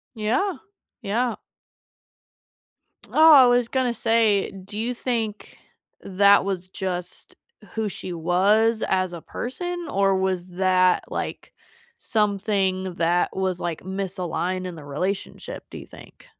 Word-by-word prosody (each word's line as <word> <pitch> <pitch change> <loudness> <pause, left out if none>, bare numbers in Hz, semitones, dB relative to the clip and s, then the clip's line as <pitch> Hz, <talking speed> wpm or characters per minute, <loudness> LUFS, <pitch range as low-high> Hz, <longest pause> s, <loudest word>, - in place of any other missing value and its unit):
Yeah. 240 - 0 0.5
Yeah. 230 +3 0 1.7
Oh, 320 +1 +7
I 260 -3 +9
was 245 -1 +3
gonna 255 -1 0
say, 225 -4 +2
do 195 +2 -9
you 240 +3 -1
think 230 -4 -3 0.4
that 200 +1 +4
was 185 -2 -3
just 180 -1 -6 0.4
who 220 -1 -2
she 185 -2 -7
was 200 +7 +2
as 185 -1 0
a 170 - -7
person 350 - -5
or 195 -3 +2
was 185 -1 -1
that, 185 0 +2
like, - - -5 0.5
something 195 -3 0
that 170 +2 +1
was, 185 -2 -1
like, 170 -2 -3
misaligned 185 -1 -3
in 180 - -6
the 150 - -10
relationship 180 +8 -4
do - - -8
you - - -11
think? - - -15
195 Hz, 125 wpm, -24 LUFS, 185-225 Hz, 1.7 s, I